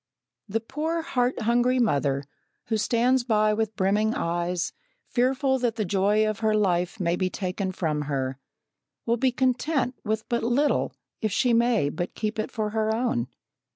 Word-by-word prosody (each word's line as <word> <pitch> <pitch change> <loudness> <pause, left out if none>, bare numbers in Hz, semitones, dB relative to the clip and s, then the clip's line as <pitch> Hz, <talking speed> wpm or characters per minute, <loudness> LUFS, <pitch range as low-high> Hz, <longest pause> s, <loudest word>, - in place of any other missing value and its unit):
The 225 +3 -1
poor 320 +7 -2
heart 250 -4 0
hungry 240 +3 +2
mother, 140 - +1 0.5
who 220 - +2
stands 240 +4 +2
by 215 -3 +2
with 220 0 -1
brimming 210 +4 +1
eyes, 175 +1 -1 0.3
fearful 265 +2 +1
that 240 -3 0
the 215 - -1
joy 205 +3 +2
of 215 -1 -2
her 220 -1 +2
life 180 -1 +1
may 170 -2 +1
be 185 0 0
taken 185 0 -3
from 155 -5 -1
her, 135 -1 -2 0.7
will 235 +1 +1
be 260 +2 +2
content 260 +1 0
with 215 0 -2
but 235 -1 0
little 250 +6 +1 0.3
if 215 - 0
she 245 +4 +2
may 230 -9 +3
but 175 +4 -4
keep 215 0 -2
it 215 - -1
for 215 -2 -2
her 220 0 0
own. 225 - 0
220 Hz, 165 wpm, -26 LUFS, 185-245 Hz, 0.7 s, may